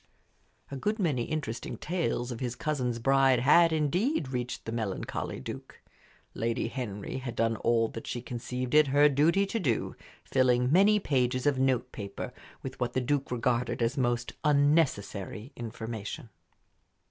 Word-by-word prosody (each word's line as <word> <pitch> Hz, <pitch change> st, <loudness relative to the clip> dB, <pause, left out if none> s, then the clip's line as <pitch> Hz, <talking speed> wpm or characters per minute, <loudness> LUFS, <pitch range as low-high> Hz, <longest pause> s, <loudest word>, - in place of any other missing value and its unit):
A -, -, -4 dB
good 210 Hz, +10 st, -1 dB
many 150 Hz, -, 0 dB
interesting 125 Hz, -7 st, -4 dB
tales 155 Hz, -7 st, -2 dB
of 115 Hz, -, -5 dB
his 125 Hz, -2 st, -3 dB
cousin's 130 Hz, -6 st, -1 dB
bride 135 Hz, 0 st, +4 dB
had, 165 Hz, +6 st, +6 dB
indeed, 160 Hz, -, 0 dB
reached 125 Hz, -1 st, -4 dB
the 115 Hz, -, -4 dB
melancholy 110 Hz, -4 st, -3 dB
Duke. -, -, -8 dB, 0.5 s
Lady 115 Hz, 0 st, -1 dB
Henry 110 Hz, -3 st, -5 dB
had 125 Hz, -2 st, -6 dB
done 115 Hz, 0 st, +1 dB
all 115 Hz, -1 st, +2 dB
that 115 Hz, -, -8 dB
she 120 Hz, -, -3 dB
conceived 125 Hz, +1 st, -5 dB
it 150 Hz, -1 st, +6 dB
her 145 Hz, +2 st, +5 dB
duty 155 Hz, +8 st, +3 dB
to 225 Hz, +3 st, -2 dB
do, 125 Hz, -, -1 dB, 0.3 s
filling 125 Hz, -1 st, +2 dB
many 200 Hz, +5 st, +5 dB
pages 130 Hz, -6 st, 0 dB
of 145 Hz, -3 st, +2 dB
note 130 Hz, -2 st, +1 dB
paper 100 Hz, -2 st, -6 dB, 0.3 s
with 135 Hz, -, -7 dB
what 125 Hz, -, -1 dB
the -, -, +1 dB
Duke 140 Hz, +2 st, 0 dB
regarded 120 Hz, 0 st, 0 dB
as 115 Hz, +3 st, 0 dB
most 120 Hz, -2 st, 0 dB
unnecessary 140 Hz, -, +1 dB
information. 115 Hz, -1 st, -6 dB
130 Hz, 150 wpm, -29 LUFS, 120-145 Hz, 0.5 s, had